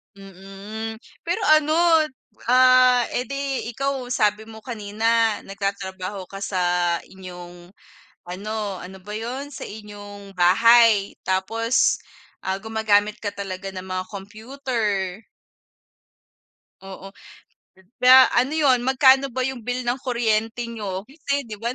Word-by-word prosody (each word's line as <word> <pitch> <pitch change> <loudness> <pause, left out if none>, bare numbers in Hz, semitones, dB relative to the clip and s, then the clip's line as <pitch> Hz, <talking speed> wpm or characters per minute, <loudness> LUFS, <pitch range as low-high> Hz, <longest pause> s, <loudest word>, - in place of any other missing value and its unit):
Mm, 195 +3 -8 0.3
pero 350 +6 -1
ano, 310 0 +4 0.7
ah, 255 0 +6
eh 250 - -2
di 275 -2 -3
ikaw 275 -1 -2
sabi 220 -3 0
mo 220 -1 -12
kanina 225 0 0
nagtatrabaho 195 -1 -5
ka 195 - -8
sa 195 -2 -2 0.4
inyong, 180 -1 -12 0.6
ano 205 +2 -4
ano 190 +1 -10
ba 210 +3 -8
yun? 250 +6 -5
Sa 285 - -8
inyong 205 -2 -11
bahay. 215 +3 +5
Tapos, 225 +6 +1 0.5
ah, 190 0 -1
gumagamit 215 -1 +1
ka 205 -2 -3
talaga 195 -1 -6
ng 185 0 -8
mga 185 0 -3
computer. 210 -2 -3 1.6
Oo, 195 0 -10 0.9
da 255 +1 +7
ano 255 +5 +1
yun, 275 -5 +4
magkano 265 +1 +5
ba 255 0 -3
yung 265 -1 -3
bill 245 +2 -3
ng 245 +2 -1
kuryente 235 -2 -1
niyo? 200 -4 -5
Kasi 280 +2 -3
di 215 -4 -9
ba 230 - -3
220 Hz, 120 wpm, -23 LUFS, 195-250 Hz, 1.6 s, da